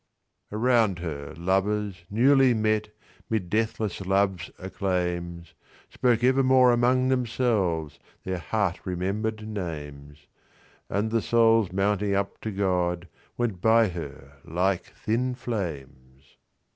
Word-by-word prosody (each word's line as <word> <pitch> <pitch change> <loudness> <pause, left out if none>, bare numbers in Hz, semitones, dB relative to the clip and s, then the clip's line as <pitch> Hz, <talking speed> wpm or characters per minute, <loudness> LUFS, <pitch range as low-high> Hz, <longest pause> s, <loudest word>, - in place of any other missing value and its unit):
Around 110 -3 +2
her, 75 -4 -6
lovers, 95 +2 -1
newly 130 +3 +4
met'Mid 110 -2 -3
deathless 110 -3 -1
love's 95 -1 +1
acclaims, 90 -3 -3 0.4
Spoke 120 -2 +1
evermore 130 -1 +5
among 125 +2 +3
themselvesTheir 95 - -1
heart 100 -6 0
remember'd 105 +4 -2
names; 75 -7 -7 0.6
And 105 +3 -1
the 115 0 +2
souls 115 -4 +3
mounting 100 +1 +1
up 100 0 -2
to 110 - -3
GodWent 90 +2 -2
by 110 0 +5
her 70 -5 -8
like 90 +2 0
thin 125 +3 -1
flames. 70 - -6
100 Hz, 95 wpm, -26 LUFS, 85-115 Hz, 0.6 s, evermore